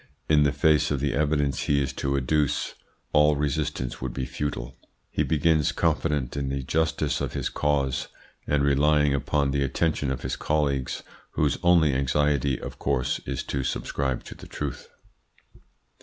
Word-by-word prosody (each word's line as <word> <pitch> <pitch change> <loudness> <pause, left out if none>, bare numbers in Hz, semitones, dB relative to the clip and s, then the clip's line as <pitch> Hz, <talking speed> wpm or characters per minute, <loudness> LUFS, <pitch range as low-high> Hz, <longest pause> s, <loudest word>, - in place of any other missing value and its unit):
In 75 -1 +5
the 70 -1 +4
face 75 +2 +3
of 70 - 0
the 70 0 0
evidence 70 -2 +1
he 70 -1 +1
is 65 -1 -1
to 70 0 -1
adduce 70 +2 0 0.4
all 75 0 +5
resistance 70 -4 -2
would 65 -1 -4
be 65 - -2
futile. 65 -2 -4 0.4
He - - 0
begins, 80 -1 +2
confident 75 -5 0
in 70 -1 -2
the 70 0 -2
justice 80 +1 0
of - - -3
his - - -2
cause, 70 -3 0 0.4
and 75 -1 +2
relying 75 +1 +3
upon 70 0 0
the 70 0 0
attention 70 +1 0
of 65 -1 -3
his 65 - -2
colleagues, 70 -4 -1 0.3
whose 75 -2 +1
only 85 -5 +4
anxiety, 70 0 +1
of - - -8
course, 70 -3 0
is - - -2
to 70 -1 -2
subscribe 65 0 -2
to - - -9
the - - -13
truth. 75 -4 -5
70 Hz, 160 wpm, -26 LUFS, 65-75 Hz, 0.4 s, In